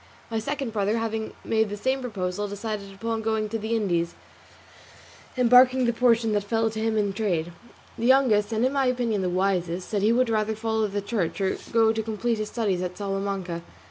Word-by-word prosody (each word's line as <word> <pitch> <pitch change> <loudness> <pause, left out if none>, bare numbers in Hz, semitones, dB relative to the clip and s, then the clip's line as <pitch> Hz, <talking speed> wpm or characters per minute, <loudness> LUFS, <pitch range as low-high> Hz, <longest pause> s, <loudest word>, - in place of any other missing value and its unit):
My 225 - 0
second 270 0 -3
brother 210 +1 +1
having 220 -1 -3
made 220 -1 +1
the 205 - -5
same 260 +5 0
proposal, 205 -4 -3
decided 205 0 -5
upon 225 +3 -3
going 220 -1 -1
to 225 +1 -3
the 220 +2 -1
Indies, 175 -6 0 1.2
embarking 250 +1 +6
the 235 - +2
portion 230 -2 +3
that 205 -1 +1
fell 225 +2 0
to 220 - -5
him 220 0 0
in 205 -2 +1
trade. 175 -6 -1 0.5
The 230 - +1
youngest, 240 -6 +4
and 225 +2 +1
in 260 - +1
my 275 -2 +2
opinion 240 -5 0
the 185 - 0
wisest, 180 -1 0
said 205 -2 -1
he 215 +3 +4
would 250 +1 +3
rather 215 0 0
follow 220 0 0
the 205 0 -3
church, 200 -5 -2
or 190 -1 +1 0.2
go 225 -1 +4
to 225 - -1
complete 225 +1 -2
his 215 - -3
studies 205 -6 -1
at 180 0 -4
Salamanca. 195 -3 -3
220 Hz, 200 wpm, -25 LUFS, 200-230 Hz, 1.2 s, embarking